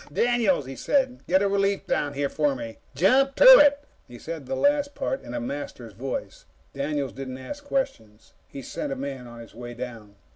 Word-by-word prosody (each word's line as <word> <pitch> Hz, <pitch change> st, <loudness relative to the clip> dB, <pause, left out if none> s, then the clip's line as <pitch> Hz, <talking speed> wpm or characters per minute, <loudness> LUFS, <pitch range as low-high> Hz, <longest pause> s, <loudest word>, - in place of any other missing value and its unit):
"Daniels," 230 Hz, -, +2 dB
he 135 Hz, +1 st, -7 dB
said, 265 Hz, -, 0 dB
"get 190 Hz, +2 st, +3 dB
a -, -, +3 dB
relief 200 Hz, 0 st, 0 dB
down 145 Hz, -1 st, -1 dB
here 140 Hz, 0 st, -1 dB
for 145 Hz, -1 st, 0 dB
me. 115 Hz, -3 st, -8 dB, 0.2 s
Jump 260 Hz, -, +3 dB
to -, -, +4 dB, 0.2 s
it!" 285 Hz, 0 st, +5 dB, 0.2 s
He 120 Hz, -, -11 dB
said 155 Hz, -1 st, -7 dB
the 135 Hz, -, -2 dB
last 285 Hz, -, +1 dB
part 265 Hz, -, -2 dB
in 120 Hz, -, -8 dB
a -, -, -1 dB
Master's 120 Hz, -3 st, -6 dB
voice. 130 Hz, +6 st, -6 dB, 0.3 s
Daniels 140 Hz, -1 st, -2 dB
didn't 130 Hz, -1 st, -6 dB
ask 285 Hz, -, -8 dB
questions. 110 Hz, -, -4 dB
He 135 Hz, -, -9 dB
sent 140 Hz, -, -5 dB
a -, -, -2 dB
man 135 Hz, -2 st, -6 dB
on 120 Hz, 0 st, -11 dB
his 115 Hz, -, -13 dB
way 120 Hz, 0 st, -8 dB
down. 115 Hz, -4 st, -8 dB
140 Hz, 195 wpm, -25 LUFS, 125-205 Hz, 0.3 s, it